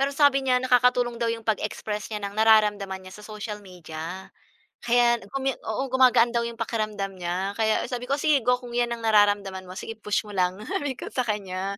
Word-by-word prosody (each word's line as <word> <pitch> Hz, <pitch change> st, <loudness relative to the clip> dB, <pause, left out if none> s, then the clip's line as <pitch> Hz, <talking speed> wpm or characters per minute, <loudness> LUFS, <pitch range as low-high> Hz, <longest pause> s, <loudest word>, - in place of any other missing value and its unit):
Pero, 280 Hz, +1 st, 0 dB
sabi 285 Hz, -2 st, +5 dB
niya 260 Hz, -2 st, +2 dB
nakakatulong 245 Hz, -1 st, +2 dB
daw 235 Hz, -, +1 dB
'yong 230 Hz, 0 st, -3 dB
pag-express 210 Hz, -1 st, -2 dB
niya 210 Hz, -2 st, -5 dB
ng 200 Hz, -, -4 dB
nararamdaman 210 Hz, -3 st, +3 dB
niya 185 Hz, -, -11 dB
sa 210 Hz, -, -11 dB
social 210 Hz, -1 st, -6 dB
media. 180 Hz, -1 st, -8 dB, 0.5 s
Kaya, 240 Hz, 0 st, +3 dB
nag-comme 270 Hz, +6 st, -2 dB
oo, 220 Hz, +4 st, -2 dB
gumagaan 250 Hz, -2 st, +5 dB
daw 235 Hz, -, +2 dB
'yong 235 Hz, 0 st, -5 dB
pakiramdam 215 Hz, -4 st, -3 dB
niya, 185 Hz, +2 st, -3 dB
kaya 220 Hz, 0 st, +1 dB
sabi 250 Hz, 0 st, -5 dB
ko, 280 Hz, -, +2 dB
"Sige 295 Hz, -2 st, +3 dB
go, 250 Hz, +2 st, +2 dB
kung 245 Hz, -1 st, -10 dB
'yan 240 Hz, 0 st, +1 dB
ang 235 Hz, -1 st, -4 dB
nararamdaman 205 Hz, -3 st, +3 dB
mo, 185 Hz, -, -8 dB
sige 225 Hz, -, -5 dB
push 210 Hz, -1 st, -2 dB
mo 205 Hz, -, -9 dB
lang," 180 Hz, 0 st, +1 dB
sabi 275 Hz, 0 st, -3 dB
ko -, -, -7 dB
sa 255 Hz, -, +1 dB
kanya. 200 Hz, -3 st, -3 dB
220 Hz, 205 wpm, -25 LUFS, 200-245 Hz, 0.5 s, sabi